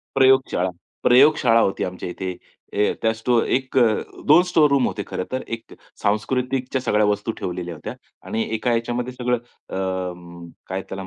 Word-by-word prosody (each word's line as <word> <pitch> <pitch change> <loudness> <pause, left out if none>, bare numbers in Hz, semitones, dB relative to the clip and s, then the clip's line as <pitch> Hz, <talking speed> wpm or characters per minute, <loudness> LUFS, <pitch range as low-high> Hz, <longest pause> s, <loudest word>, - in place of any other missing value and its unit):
प्रयोगशाळा. 130 -8 +3 0.3
प्रयोगशाळा 125 -3 +5
होती 95 - +1
आमच्या 90 0 -5
इथे. 95 +1 -4 0.4
अ, 105 +1 +2
त्या 115 - +3
स्टो 115 +1 +2
एक 130 0 -1
अ, - - +6 0.4
2 155 +4 +7
स्टोर 155 -4 +5
रूम 140 -2 +3
होते 105 - -3
खरं 90 - -4
तर 130 - -1
एक 115 - -21 0.3
सांस्कृतिकच्या 125 +5 0
सगळ्या 105 -4 +2
वस्तू 105 +2 0
ठेवलेल्या 90 -1 -4
होत्या 75 - -7 0.3
आणि 115 - -1
एका 120 +2 0
याच्यामध्ये 120 +2 -2
सगळं 125 -1 0 0.3
अ, - - -6 0.4
म 85 -1 -12 0.2
काय 95 +1 -3
त्याला 95 0 -5
म - - -8
115 Hz, 170 wpm, -22 LUFS, 95-130 Hz, 0.4 s, 2